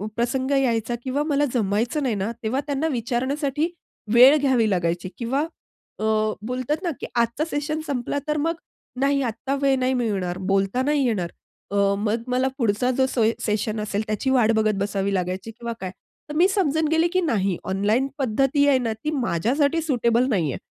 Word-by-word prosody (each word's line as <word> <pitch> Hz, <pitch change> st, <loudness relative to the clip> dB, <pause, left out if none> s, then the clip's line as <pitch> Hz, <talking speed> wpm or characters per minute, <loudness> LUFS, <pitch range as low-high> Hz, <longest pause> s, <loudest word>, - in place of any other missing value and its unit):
प्रसंग 260 Hz, +3 st, -1 dB
यायचा 240 Hz, -4 st, +1 dB
किंवा 275 Hz, +3 st, -1 dB
मला 290 Hz, -1 st, +1 dB
जमायचं 230 Hz, +6 st, 0 dB
नाही 240 Hz, -5 st, 0 dB
ना, 200 Hz, +3 st, -2 dB
तेव्हा 235 Hz, +5 st, 0 dB
त्यांना 285 Hz, +3 st, 0 dB
विचारण्यासाठी 270 Hz, +5 st, -1 dB, 0.5 s
वेळ 255 Hz, +5 st, +8 dB
घ्यावी 260 Hz, -6 st, +2 dB
लागायची 175 Hz, -1 st, -1 dB
किंवा 265 Hz, +5 st, 0 dB, 0.5 s
अ, -, -, -4 dB, 0.4 s
बोलतात 255 Hz, +7 st, -2 dB
ना, 355 Hz, -, 0 dB
की -, -, -5 dB
आजचा 235 Hz, +5 st, +1 dB
सेशन 295 Hz, +2 st, -2 dB
संपला. 275 Hz, -1 st, -2 dB
तर 300 Hz, 0 st, 0 dB
मग 325 Hz, +3 st, 0 dB, 0.4 s
नाही, 275 Hz, 0 st, +2 dB
आता 245 Hz, +4 st, -2 dB
वेळ 275 Hz, -1 st, +3 dB
नाही 255 Hz, +1 st, +1 dB
मिळणार, 195 Hz, -7 st, -1 dB
बोलता 195 Hz, +5 st, 0 dB
नाही 285 Hz, -1 st, +2 dB
येणार. 190 Hz, -8 st, 0 dB, 0.4 s
अ, -, -, -2 dB, 0.2 s
मग 220 Hz, +2 st, -1 dB
मला 255 Hz, +1 st, +1 dB
पुढचा 235 Hz, 0 st, +1 dB
जो 260 Hz, -, +4 dB
सोय 225 Hz, -3 st, +2 dB
सेशन 215 Hz, 0 st, -1 dB
असेल, 205 Hz, -1 st, -2 dB
त्याची 215 Hz, +5 st, -1 dB
वाट 245 Hz, -4 st, +4 dB
बघत 215 Hz, -1 st, +2 dB
बसावी 200 Hz, 0 st, -1 dB
लागायची 185 Hz, +3 st, -2 dB
किंवा 235 Hz, +1 st, -6 dB
काय. 185 Hz, -1 st, -4 dB, 0.4 s
तर 300 Hz, -, -5 dB
मी 350 Hz, +4 st, +5 dB
समजून 320 Hz, -6 st, +1 dB
गेली 325 Hz, +1 st, +3 dB
की 370 Hz, -, +3 dB
नाही 200 Hz, -, 0 dB
ऑनलाईन 210 Hz, +7 st, +1 dB
पद्धती 270 Hz, +3 st, +2 dB
आहे 275 Hz, -, +5 dB
ना, 230 Hz, -3 st, -1 dB
ती 260 Hz, +8 st, -4 dB
माझ्यासाठी 275 Hz, -, +1 dB
सुटेबल 245 Hz, -4 st, +2 dB
नाही 170 Hz, -, +1 dB
आहे. -, -, -6 dB
245 Hz, 175 wpm, -23 LUFS, 215-280 Hz, 0.5 s, वेळ